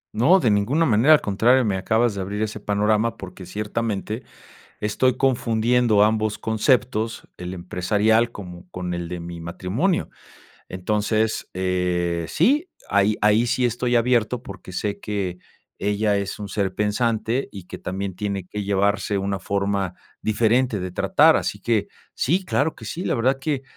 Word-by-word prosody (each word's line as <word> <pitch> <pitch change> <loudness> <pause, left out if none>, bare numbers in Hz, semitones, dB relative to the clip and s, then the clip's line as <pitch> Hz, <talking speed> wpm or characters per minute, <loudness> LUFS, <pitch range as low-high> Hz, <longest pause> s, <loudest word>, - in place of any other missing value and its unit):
No, 150 - +5
de 120 -9 +2
ninguna 120 +11 +2
manera, 120 +5 +5
al - - 0
contrario, 120 +6 +3
me 100 -3 0
acabas 110 +4 +1
de 100 - -4
abrir 100 +3 -3
ese 110 0 -4
panorama 105 +2 +1
porque 95 -1 -9
ciertamente 105 +2 -3 0.6
estoy 125 +4 +1
confundiendo 120 -3 +2
ambos 110 0 +2
conceptos, 115 0 0
el 90 +1 -6
empresarial, 105 +6 +1
como 90 -4 -10
con 90 -1 -4
el 85 -1 -4
de 90 0 -5
mi 85 0 -7
matrimonio. 95 - -1 0.6
Entonces, 105 +4 -1
eh, 90 -2 0
sí, 285 - +2 0.2
ahí 100 +1 +3
ahí 105 +3 +4
sí 125 +1 +1
estoy 120 +1 -1
abierto 120 0 +2
porque 95 -4 -10
sé 100 +2 -2
que 100 -4 -3 0.4
ella 105 0 +1
es 100 -1 -3
un 100 - -5
ser 95 -1 -1
pensante, 110 +4 0
y 100 -4 -9
que - - -7
también 95 +1 -4
tiene 100 -2 -3
que 105 +3 -5
llevarse 100 0 +1
una 100 0 -2
forma 100 -1 -1 0.3
diferente 115 +2 +2
de 90 0 -4
tratar, - - +4
así - - -2
que 110 -4 +1 0.3
sí, 180 +8 +1
claro 160 -3 0
que - - -11
sí. 175 +3 -5
La - - 0
verdad 130 +3 +2
que 140 -2 -1
105 Hz, 155 wpm, -23 LUFS, 95-120 Hz, 0.6 s, No